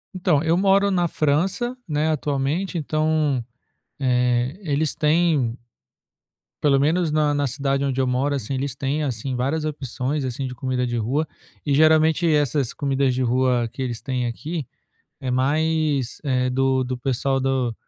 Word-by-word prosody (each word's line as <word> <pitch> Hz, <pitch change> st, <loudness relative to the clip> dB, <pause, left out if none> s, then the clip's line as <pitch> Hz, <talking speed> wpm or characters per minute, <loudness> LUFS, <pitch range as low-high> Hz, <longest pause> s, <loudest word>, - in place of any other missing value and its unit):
Então, 170 Hz, -5 st, +2 dB
eu 165 Hz, +1 st, +2 dB
moro 195 Hz, +2 st, +3 dB
na 175 Hz, -2 st, +2 dB
França, 175 Hz, -, 0 dB
né, 155 Hz, +1 st, +1 dB
atualmente, 150 Hz, +5 st, -1 dB
então, 155 Hz, -4 st, 0 dB, 0.6 s
é, 125 Hz, +2 st, +1 dB
eles 150 Hz, -2 st, 0 dB
têm 150 Hz, -6 st, +2 dB, 1.0 s
pelo 140 Hz, -2 st, +3 dB
menos 160 Hz, +4 st, +2 dB
na 150 Hz, -1 st, +2 dB
na 145 Hz, 0 st, +1 dB
cidade 135 Hz, +1 st, -1 dB
onde 135 Hz, -1 st, -1 dB
eu 130 Hz, -, +2 dB
moro, 135 Hz, +3 st, 0 dB
assim, 135 Hz, +1 st, -4 dB
eles 135 Hz, 0 st, -3 dB
têm 140 Hz, +3 st, -1 dB
assim 130 Hz, -1 st, -3 dB
várias 140 Hz, +6 st, -1 dB
opções 140 Hz, -1 st, -3 dB
assim 130 Hz, +1 st, -3 dB
de 125 Hz, -, -6 dB
comida 130 Hz, -1 st, -1 dB
de 120 Hz, 0 st, -2 dB
rua 130 Hz, +8 st, 0 dB, 0.4 s
e 145 Hz, -, +2 dB
geralmente 155 Hz, +2 st, +4 dB
essas 145 Hz, -3 st, +1 dB
comidas 135 Hz, -2 st, 0 dB
de 130 Hz, -, -2 dB
rua 125 Hz, -1 st, +1 dB
que 135 Hz, -, -5 dB
eles 120 Hz, -3 st, -3 dB
têm 130 Hz, -2 st, -2 dB
aqui 150 Hz, +7 st, -4 dB, 0.6 s
é 130 Hz, -1 st, -2 dB
mais, 145 Hz, 0 st, 0 dB
é, 130 Hz, -3 st, +1 dB
do 130 Hz, 0 st, +1 dB
do 130 Hz, 0 st, -3 dB
pessoal 135 Hz, +1 st, 0 dB
do 130 Hz, -3 st, 0 dB
140 Hz, 160 wpm, -23 LUFS, 130-155 Hz, 1.0 s, geralmente